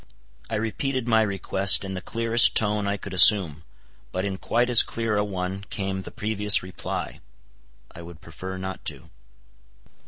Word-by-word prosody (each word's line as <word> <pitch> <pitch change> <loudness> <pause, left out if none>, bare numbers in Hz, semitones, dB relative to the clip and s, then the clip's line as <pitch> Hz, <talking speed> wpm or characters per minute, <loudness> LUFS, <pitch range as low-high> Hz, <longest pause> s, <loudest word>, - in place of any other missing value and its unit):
I - - -5
repeated 120 +3 -5
my 110 -1 +1
request 100 -1 +2
in 95 - -8
the 95 - -7
clearest 115 +3 +3
tone 105 -1 -3
I 100 0 -3
could 100 -1 -11
assume. 90 -5 +6 0.5
But 95 +1 -5
in 95 -1 -6
quite 120 +1 -2
as 120 -2 +8
clear 115 -2 -5
a 105 - -1
one 95 -1 -7
came 95 -1 -5
the - - -11
previous 105 -1 +1
reply, 95 0 -8 0.7
"I 85 - -14
would 85 -1 -14
prefer 95 +4 -10
not 95 0 -9
to." 80 0 -8
100 Hz, 160 wpm, -22 LUFS, 95-110 Hz, 0.7 s, as